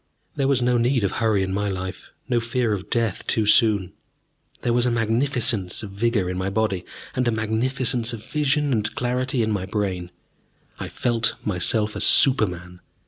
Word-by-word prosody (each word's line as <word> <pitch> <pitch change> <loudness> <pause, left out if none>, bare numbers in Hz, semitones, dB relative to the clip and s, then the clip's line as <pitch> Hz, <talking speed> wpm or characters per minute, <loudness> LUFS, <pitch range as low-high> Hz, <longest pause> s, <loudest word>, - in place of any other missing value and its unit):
There 135 - 0
was 135 -3 +2
no 125 0 +2
need 120 0 +1
of 100 - +1
hurry 110 -4 +1
in 95 0 -3
my 105 +1 -1
life, 95 -1 -6 0.2
no 120 -2 +1
fear 120 -1 0
of 95 -2 -5
death 115 -5 -1
too 110 - +1
soon. 105 -3 +3 0.7
There 120 - +1
was 120 +1 +2
a - - +3
magnificence 115 -4 +1
of 100 - -7
vigor 105 -1 0
in 90 0 -3
my 95 +1 -1
body, 100 -3 -1 0.3
and 130 -1 0
a - - +3
magnificence 115 +2 0
of 115 -3 -8
vision 150 -1 +1
and 105 -2 -1
clarity 125 0 -1
in 110 - -1
my 95 -3 -2
brain. 95 -4 -2 0.7
I - - -4
felt 115 -1 0
myself 105 +2 +1
a - - -3
super 130 -6 +5
man. 90 0 -9
110 Hz, 185 wpm, -23 LUFS, 100-120 Hz, 0.7 s, super